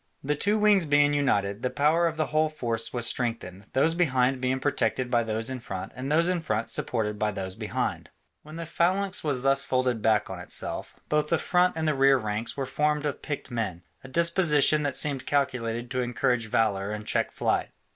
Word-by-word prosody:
The 145 Hz, +2 st, 0 dB
two 205 Hz, +8 st, +1 dB
wings 205 Hz, -5 st, +4 dB
being 145 Hz, 0 st, +4 dB
united, 105 Hz, -8 st, 0 dB
the 125 Hz, -, 0 dB
power 150 Hz, +6 st, +2 dB
of 165 Hz, -1 st, -4 dB
the 155 Hz, -, +1 dB
whole 155 Hz, +1 st, +1 dB
force 115 Hz, -6 st, -2 dB
was 120 Hz, -2 st, 0 dB
strengthened, 115 Hz, -6 st, -2 dB
those 155 Hz, +5 st, +3 dB
behind 130 Hz, -6 st, +1 dB
being 130 Hz, +1 st, 0 dB
protected 130 Hz, -2 st, -1 dB
by 120 Hz, -1 st, +3 dB
those 115 Hz, +2 st, -2 dB
in 130 Hz, -, -4 dB
front 95 Hz, -6 st, -6 dB
and 130 Hz, +3 st, -4 dB
those 165 Hz, +3 st, +3 dB
in 180 Hz, -2 st, 0 dB
front 110 Hz, -6 st, -2 dB
supported 105 Hz, -3 st, -2 dB
by 105 Hz, -, +1 dB
those 95 Hz, -2 st, -3 dB
behind. -, -, -3 dB, 0.3 s
When 155 Hz, +1 st, -12 dB
the 165 Hz, 0 st, -5 dB
phalanx 185 Hz, +4 st, 0 dB
was 140 Hz, -5 st, -1 dB
thus 135 Hz, 0 st, +2 dB
folded 130 Hz, -4 st, 0 dB
back 110 Hz, -1 st, +2 dB
on 95 Hz, -2 st, -7 dB
itself, 90 Hz, -, -5 dB
both 150 Hz, 0 st, 0 dB
the 170 Hz, -, +3 dB
front 180 Hz, 0 st, +1 dB
and 160 Hz, -1 st, -1 dB
the 155 Hz, -, +2 dB
rear 135 Hz, 0 st, +4 dB
ranks 110 Hz, +1 st, -3 dB
were 135 Hz, -, -1 dB
formed 150 Hz, +2 st, 0 dB
of 145 Hz, -, -3 dB
picked 145 Hz, -3 st, -5 dB
men, 95 Hz, -7 st, -3 dB, 0.2 s
a -, -, -9 dB
disposition 155 Hz, -1 st, +4 dB
that 145 Hz, -2 st, -2 dB
seemed 140 Hz, -3 st, 0 dB
calculated 120 Hz, -4 st, -1 dB
to 130 Hz, -1 st, 0 dB
encourage 120 Hz, -1 st, 0 dB
valour 105 Hz, -3 st, 0 dB
and 105 Hz, 0 st, -5 dB
check -, -, 0 dB
flight. -, -, -1 dB
130 Hz, 205 wpm, -27 LUFS, 115-155 Hz, 0.3 s, wings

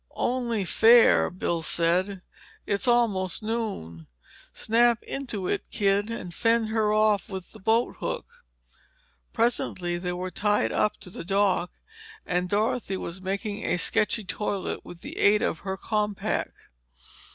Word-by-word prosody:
"Only 235 Hz, -5 st, 0 dB
fair," 230 Hz, +5 st, +6 dB
Bill 175 Hz, -2 st, -2 dB
said. 180 Hz, +4 st, 0 dB, 0.4 s
"It's 200 Hz, +5 st, -1 dB
almost 215 Hz, -6 st, +2 dB
noon. 200 Hz, -, -4 dB, 0.4 s
Snap 235 Hz, +1 st, +2 dB
into 230 Hz, -9 st, -4 dB
it, -, -, -2 dB
kid, 200 Hz, +1 st, +1 dB
and 185 Hz, -6 st, -6 dB
fend 230 Hz, +1 st, +2 dB
her 220 Hz, -1 st, +1 dB
off 215 Hz, 0 st, +2 dB
with 190 Hz, -3 st, -7 dB
the 220 Hz, -, -14 dB
boathook." 225 Hz, +4 st, 0 dB, 1.1 s
Presently 185 Hz, -7 st, 0 dB
they 180 Hz, 0 st, -3 dB
were 180 Hz, +1 st, -4 dB
tied 205 Hz, +1 st, +1 dB
up 210 Hz, -, +1 dB
to 180 Hz, -, -11 dB
the -, -, -7 dB
dock 195 Hz, -1 st, +1 dB, 0.5 s
and 180 Hz, 0 st, -1 dB
Dorothy 210 Hz, -1 st, 0 dB
was 185 Hz, +1 st, -6 dB
making 200 Hz, +3 st, -3 dB
a 175 Hz, -, 0 dB
sketchy 215 Hz, +5 st, 0 dB
toilet 200 Hz, 0 st, -3 dB
with 175 Hz, -1 st, -12 dB
the -, -, -7 dB
aid 210 Hz, +1 st, +4 dB
of 160 Hz, -, -1 dB
her 190 Hz, -1 st, -4 dB
compact. 210 Hz, -1 st, -2 dB
205 Hz, 135 wpm, -26 LUFS, 185-225 Hz, 1.1 s, fair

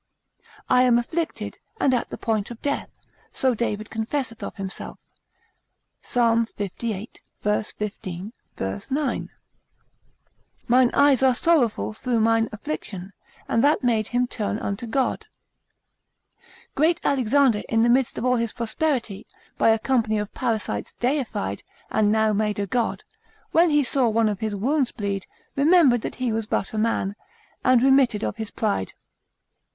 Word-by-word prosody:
I 250 Hz, -, +5 dB
am 250 Hz, -2 st, +5 dB
afflicted, 320 Hz, +8 st, -3 dB, 0.2 s
and 265 Hz, -, +3 dB
at 245 Hz, -, 0 dB
the -, -, -6 dB
point 215 Hz, -3 st, -1 dB
of 235 Hz, -2 st, -9 dB
death, 285 Hz, 0 st, -1 dB, 0.4 s
so 260 Hz, -1 st, +1 dB
David 215 Hz, -2 st, -3 dB
confesseth 225 Hz, +1 st, -3 dB
of -, -, -5 dB
himself, 195 Hz, -1 st, -6 dB, 1.0 s
Psal. 230 Hz, -1 st, +2 dB
lxxxviii. 210 Hz, +1 st, -4 dB, 0.3 s
v. 210 Hz, +1 st, +1 dB
15, 195 Hz, -1 st, -5 dB, 0.2 s
v. 95 Hz, +1 st, -3 dB
9. 280 Hz, 0 st, -1 dB, 1.4 s
Mine 250 Hz, 0 st, +4 dB
eyes 280 Hz, -3 st, +5 dB
are 260 Hz, -2 st, +4 dB
sorrowful 255 Hz, -10 st, +2 dB
through 240 Hz, +1 st, -1 dB
mine 225 Hz, 0 st, +3 dB
affliction: 190 Hz, 0 st, -5 dB, 0.3 s
and 230 Hz, -, +2 dB
that 290 Hz, -1 st, +3 dB
made 225 Hz, -4 st, +2 dB
him 245 Hz, 0 st, +1 dB
turn 215 Hz, -4 st, -2 dB
unto 200 Hz, +2 st, -4 dB
God. 260 Hz, +3 st, -1 dB, 1.5 s
Great 325 Hz, +4 st, +2 dB
Alexander 265 Hz, -3 st, +3 dB
in 225 Hz, 0 st, +3 dB
the -, -, +4 dB
midst 255 Hz, +1 st, +2 dB
of -, -, -2 dB
all 250 Hz, 0 st, +3 dB
his 230 Hz, -1 st, -1 dB
prosperity, 235 Hz, -3 st, -2 dB, 0.3 s
by -, -, +5 dB
a 225 Hz, -, +5 dB
company 220 Hz, -2 st, +1 dB
of 210 Hz, -1 st, -4 dB
parasites 230 Hz, -5 st, -2 dB
deified, 240 Hz, -, -1 dB, 0.3 s
and 210 Hz, -1 st, +3 dB
now 220 Hz, 0 st, +3 dB
made 210 Hz, 0 st, 0 dB
a 200 Hz, -, -1 dB
god, 235 Hz, +3 st, -1 dB, 0.5 s
when 335 Hz, +1 st, +5 dB
he 295 Hz, -1 st, +3 dB
saw 260 Hz, -2 st, +2 dB
one 220 Hz, 0 st, +2 dB
of 205 Hz, -3 st, -3 dB
his 215 Hz, -2 st, -2 dB
wounds 260 Hz, +5 st, +1 dB
bleed, 200 Hz, -2 st, -3 dB, 0.3 s
remembered 280 Hz, -5 st, +5 dB
that -, -, -5 dB
he 250 Hz, -2 st, -1 dB
was 220 Hz, -1 st, -2 dB
but 195 Hz, -, -2 dB
a 215 Hz, -, -1 dB
man, 215 Hz, -3 st, 0 dB, 0.5 s
and 255 Hz, -1 st, +4 dB
remitted 265 Hz, -5 st, +4 dB
of -, -, -2 dB
his 220 Hz, -2 st, -3 dB
pride. 205 Hz, -, -2 dB
230 Hz, 150 wpm, -24 LUFS, 215-255 Hz, 1.5 s, I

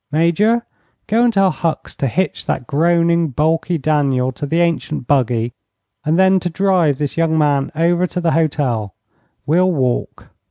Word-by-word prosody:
Major, 200 Hz, +10 st, +2 dB, 0.4 s
go 230 Hz, +3 st, +2 dB
and 240 Hz, -, +3 dB
tell 195 Hz, -3 st, +2 dB
Hucks 165 Hz, -2 st, -3 dB
to 135 Hz, -, -1 dB
hitch 185 Hz, +10 st, -2 dB
that 125 Hz, -, -2 dB
groaning, 170 Hz, +3 st, +2 dB
balky 160 Hz, +5 st, 0 dB
Daniel 135 Hz, -4 st, 0 dB
to 145 Hz, +3 st, -6 dB
the 165 Hz, +3 st, 0 dB
ancient 165 Hz, -5 st, -1 dB
buggy, 120 Hz, -3 st, 0 dB, 0.5 s
and 155 Hz, +2 st, +1 dB
then 190 Hz, 0 st, +4 dB
to 175 Hz, -, -3 dB
drive 175 Hz, -5 st, +1 dB
this 145 Hz, +1 st, -4 dB
young 165 Hz, -1 st, +1 dB
man 145 Hz, -3 st, +1 dB
over 170 Hz, +3 st, +1 dB
to 180 Hz, -, -4 dB
the 170 Hz, -2 st, 0 dB
hotel. 135 Hz, -, -1 dB, 0.5 s
We'll 180 Hz, +5 st, +2 dB
walk." 130 Hz, -6 st, -2 dB
160 Hz, 160 wpm, -18 LUFS, 140-175 Hz, 0.5 s, then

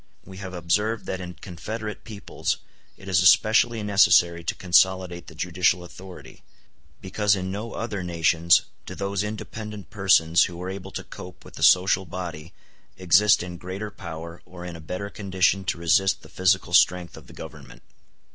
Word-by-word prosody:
We 95 Hz, -, -11 dB
have 95 Hz, -1 st, -7 dB
observed 105 Hz, +6 st, -1 dB
that 95 Hz, -1 st, -4 dB
in 90 Hz, -1 st, -8 dB
confederate 105 Hz, +5 st, -7 dB
peoples 110 Hz, -4 st, -4 dB, 0.4 s
it 95 Hz, -, -14 dB
is 90 Hz, -2 st, +3 dB
especially 110 Hz, +4 st, +4 dB
necessary 90 Hz, -4 st, +4 dB
to -, -, -2 dB
consolidate 90 Hz, -1 st, +2 dB
the 80 Hz, -, -12 dB
judicial 90 Hz, +2 st, 0 dB
authority, 90 Hz, +1 st, -12 dB, 0.6 s
because 100 Hz, +2 st, +1 dB
in 95 Hz, -1 st, -4 dB
no 105 Hz, +4 st, -6 dB
other 105 Hz, -4 st, -4 dB
nations 85 Hz, -1 st, +3 dB, 0.2 s
do 95 Hz, -, -7 dB
those 100 Hz, 0 st, -2 dB
independent 105 Hz, 0 st, -7 dB
persons 95 Hz, -6 st, +4 dB
who 85 Hz, -1 st, -8 dB
are 90 Hz, +1 st, -5 dB
able 95 Hz, 0 st, -8 dB
to -, -, -6 dB
cope 90 Hz, 0 st, -12 dB
with -, -, -14 dB
the -, -, -10 dB
social 95 Hz, +1 st, +4 dB
body 85 Hz, -2 st, -7 dB, 0.5 s
exist 95 Hz, +2 st, +4 dB
in 90 Hz, -1 st, -7 dB
greater 95 Hz, +4 st, -6 dB
power 85 Hz, -3 st, -9 dB
or 90 Hz, -1 st, -11 dB
in 90 Hz, -1 st, -7 dB
a 80 Hz, -, -10 dB
better 90 Hz, +6 st, -6 dB
condition 95 Hz, -1 st, 0 dB
to 95 Hz, -, -1 dB
resist 85 Hz, +3 st, +2 dB
the -, -, -14 dB
physical 95 Hz, 0 st, +1 dB
strength 90 Hz, -1 st, +3 dB
of 80 Hz, -5 st, -14 dB
the -, -, -14 dB
Government. -, -, -12 dB
95 Hz, 165 wpm, -24 LUFS, 85-100 Hz, 0.6 s, especially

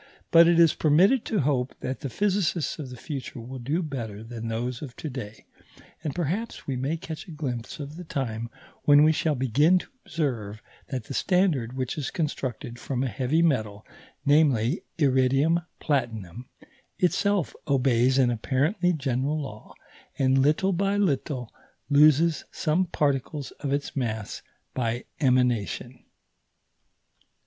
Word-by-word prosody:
But 165 Hz, 0 st, +8 dB
it 170 Hz, -1 st, +4 dB
is 165 Hz, -2 st, +6 dB
permitted 185 Hz, -, +4 dB
to 215 Hz, -, 0 dB
hope 135 Hz, -2 st, 0 dB
that 130 Hz, +1 st, -3 dB
the 140 Hz, -, -4 dB
physicists 185 Hz, -, 0 dB
of 140 Hz, -4 st, -6 dB
the 125 Hz, -, -9 dB
future 135 Hz, -1 st, -6 dB
will 125 Hz, +3 st, -7 dB
do 125 Hz, +5 st, -4 dB
still 170 Hz, -, +2 dB
better 115 Hz, -8 st, -5 dB
than 115 Hz, 0 st, -6 dB
those 120 Hz, +2 st, -3 dB
of 130 Hz, -6 st, -8 dB
to 155 Hz, -, -6 dB
day; 110 Hz, -4 st, -8 dB, 0.6 s
and 150 Hz, -4 st, -3 dB
perhaps 180 Hz, +7 st, -3 dB
we 135 Hz, -, -2 dB
may 135 Hz, +6 st, -1 dB
catch 160 Hz, 0 st, -7 dB
a -, -, -9 dB
glimpse 130 Hz, -7 st, -5 dB
of 145 Hz, +2 st, -7 dB
the 180 Hz, -, -7 dB
time 115 Hz, -7 st, -3 dB, 0.4 s
when 145 Hz, 0 st, +7 dB
we 155 Hz, -, +6 dB
shall 155 Hz, -1 st, 0 dB
begin 140 Hz, +8 st, +3 dB
to -, -, -5 dB
observe 115 Hz, -9 st, -3 dB, 0.2 s
that 130 Hz, -4 st, -4 dB
the 135 Hz, -, -8 dB
standard, 165 Hz, -10 st, +1 dB
which 130 Hz, +2 st, -3 dB
is 140 Hz, -, -2 dB
constructed 130 Hz, -6 st, -4 dB
from 130 Hz, 0 st, -2 dB
a -, -, 0 dB
heavy 135 Hz, +6 st, +1 dB
metal, 110 Hz, -9 st, 0 dB, 0.4 s
namely, 145 Hz, -, +3 dB, 0.2 s
iridium 135 Hz, +3 st, +3 dB, 0.2 s
platinum, 120 Hz, -, -2 dB, 0.5 s
itself 195 Hz, 0 st, +1 dB
obeys 130 Hz, -2 st, +3 dB
an 125 Hz, -2 st, +4 dB
apparently 150 Hz, -, +1 dB
general 135 Hz, 0 st, -1 dB
law, 110 Hz, -7 st, -8 dB, 0.5 s
and 135 Hz, 0 st, +3 dB
little 155 Hz, +7 st, +2 dB
by 195 Hz, +3 st, +1 dB
little 135 Hz, -, -1 dB, 0.4 s
loses 150 Hz, +1 st, +5 dB
some 165 Hz, +4 st, +1 dB
particles 145 Hz, -2 st, -1 dB
of 140 Hz, -2 st, -3 dB
its 140 Hz, 0 st, -2 dB
mass 110 Hz, -6 st, -3 dB, 0.3 s
by 120 Hz, -1 st, -2 dB
emanation. 125 Hz, -, +1 dB
135 Hz, 150 wpm, -26 LUFS, 125-155 Hz, 0.6 s, But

